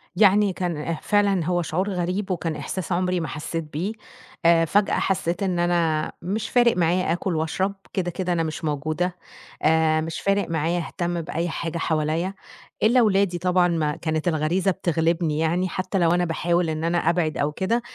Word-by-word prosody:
يعني 200 0 +4
كان 170 -3 -2
فعلًا 200 -4 +2
هو 175 +1 +1
شعور 180 +4 -1
غريب 185 +1 -2
وكان 165 -3 -2
إحساس 185 -1 -5
عمري 180 +1 +1
ما 160 - -3
حسيت 165 +3 -4
بيه، 155 +7 -3 0.5
آآ، 165 0 +5
فجأة 200 +5 +2
حسيت 185 0 -1
إن 185 -3 0
أنا 170 -3 +1
مش 205 +5 -3
فارق 240 -3 +4
معايا 175 0 +2
آكل 175 0 -2
وأشرب، 185 +5 -1 0.2
كده 180 -2 -1
كده 180 0 -2
أنا 165 -1 +1
مش 160 +3 -5
موجودة، 155 +4 -1 0.5
آآ، 155 0 +3
مش 160 +1 -4
فارق 200 -1 +1
معايا 165 +2 0
أهتم 175 -1 -2
بأي 165 +1 -3
حاجة 165 +1 -3
حواليا، 160 +3 0 0.5
إلا 235 +4 +5
أولادي 200 -5 +3
طبعًا 180 0 +2
ما 155 -4 0
كانت 155 0 -2
الغريزة 170 +4 +1
بتغلبني 165 -2 0
يعني، 175 +3 +1
حتى 185 +2 -2
لو 170 -2 +3
أنا 175 0 +2
باحاول 170 +1 0
إن 155 0 -3
أنا 170 +1 +1
أبعد 165 -2 +1
أو 145 +1 0
كده، 200 +9 0
175 Hz, 175 wpm, -24 LUFS, 160-185 Hz, 0.5 s, آآ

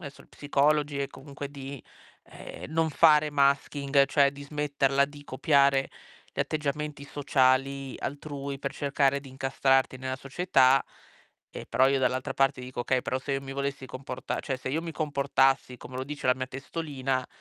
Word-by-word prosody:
esso, 140 -4 -10
psicologi 145 0 +1
è 140 - 0
comunque 140 0 -9
di, 140 -2 -8 0.4
ehm, - - -10
non 165 0 +2
fare 150 0 +5
masking, 140 0 +2
cioè 140 0 +4
di 140 0 -11
smetterla 140 -2 +1
di 145 0 -13
copiare 140 0 +3 0.4
gli - - -12
atteggiamenti 150 -1 -2
sociali 135 -1 +1
altrui, 140 -1 -5
per 140 - -3
cercare 140 -1 +1
di 135 - -12
incastrarti 135 0 +1
nella 130 0 -3
società. 135 -2 +3 0.7
Eh, - - -8
però 130 +1 +3
io 135 0 +2
dall'altra 130 +1 0
parte 135 -1 +2
dico: 125 0 -6
"Okay, 125 +1 +1
però 130 - -1
se 140 +1 -4
io 135 - 0
mi 135 - -8
volessi 140 -1 -3
comporta 130 0 -5
cioè 135 -2 -3
se 130 - -6
io 160 - 0
mi 165 -1 -5
comportassi 140 -4 +1
come 125 +2 -10
lo 130 - -3
dice 145 -1 -5
la 125 - +6
mia 130 0 -3
testolina, 135 -1 -3
140 Hz, 165 wpm, -28 LUFS, 135-145 Hz, 0.7 s, la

